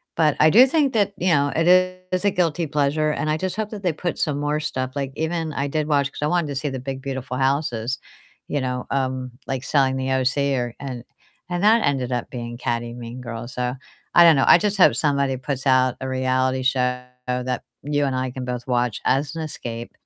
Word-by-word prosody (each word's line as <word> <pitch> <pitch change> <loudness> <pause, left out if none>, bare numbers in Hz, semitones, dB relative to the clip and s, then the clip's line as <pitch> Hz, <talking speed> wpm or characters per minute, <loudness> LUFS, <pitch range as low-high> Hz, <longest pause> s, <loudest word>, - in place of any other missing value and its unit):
but 155 -3 +3
I 155 0 +6
do 250 +5 +8
think 280 -2 +2
that, 205 -2 +1
you 180 -1 +2
know, 140 -1 +2
it 165 +2 +2 0.4
is 185 +1 0
a - - +5
guilty 170 -2 0
pleasure, 150 +1 +1
and 155 - -2
I 155 - +1
just 185 +2 -3
hope 215 -1 -3
that 205 -2 -6
they 180 -3 +1
put 175 +2 -3
some 145 -2 0
more 150 +1 0
stuff, 130 -4 -3
like, 140 -1 -2
even 160 0 -2
I 140 +1 -1
did 155 +1 -1
watch, 145 -2 +1
'cause - - -10
I 150 - +1
wanted 175 -2 +1
to 140 - -4
see 145 +2 -2
the 130 -1 -4
big, 135 +1 -5
beautiful 130 -2 -4
houses, 130 -3 0 0.5
you 145 -2 -1
know, 125 -1 -3
um, 130 -2 -1 0.2
like 135 -1 -3
Selling 135 -2 +2
the 130 0 -2
OC 135 +1 +1
or 120 -2 -2
and 125 -4 -6 0.5
and 175 +1 -2
that 225 +2 +5
ended 130 -3 0
up 120 -1 -2
being 120 -1 -6
catty, 120 -1 -2
mean 120 +1 -8
girls, 120 +1 -7
so 125 0 -1 0.4
I 175 - +8
don't 165 -2 +7
know, 135 - +3
I - - +9
just 205 +1 0
hope 185 - +6
somebody 140 -3 +1
puts 135 +1 -4
out 130 -1 +4
a 130 - -3
reality 130 0 0
show 125 -1 +1 0.2
that 125 0 -2 0.2
you 145 0 0
and 135 -1 -1
I 130 0 -2
can 125 0 -6
both 125 0 -5
watch 120 -3 0
as 140 +4 +1
an 165 - -3
escape 120 -6 -6
135 Hz, 225 wpm, -22 LUFS, 125-155 Hz, 0.5 s, I